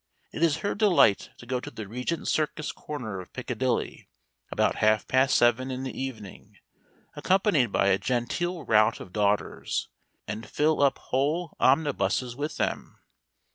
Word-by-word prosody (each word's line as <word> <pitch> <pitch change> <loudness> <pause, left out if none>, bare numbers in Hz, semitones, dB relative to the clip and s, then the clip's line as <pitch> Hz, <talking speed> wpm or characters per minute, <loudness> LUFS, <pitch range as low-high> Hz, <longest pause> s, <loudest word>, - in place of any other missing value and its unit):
It - - -6
is 160 -2 +3
her - - +1
delight 195 - +3
to - - -13
go 125 +1 -2
to 145 - -8
the 110 -7 -8
Regent 125 +9 -3
Circus 155 -1 -1
corner 120 -10 -6
of 90 - -10
Piccadilly, - - -2 0.4
about - - +1
half 110 -1 +2
past 130 +2 +3
seven 120 +2 +3
in 130 0 -4
the 130 - -5
evening, 115 -7 -7 0.6
accompanied 185 - +2
by 100 - +2
a 95 0 +3
genteel 155 +8 -2
rout 110 -1 +3
of 90 - -11
daughters, 105 -1 -1 0.4
and 105 +2 -6
fill 155 0 +1
up 140 -1 +3
whole 150 +6 -1
omnibuses 130 -4 +1
with 145 +3 -4
them. - - -3
130 Hz, 150 wpm, -27 LUFS, 110-150 Hz, 0.6 s, is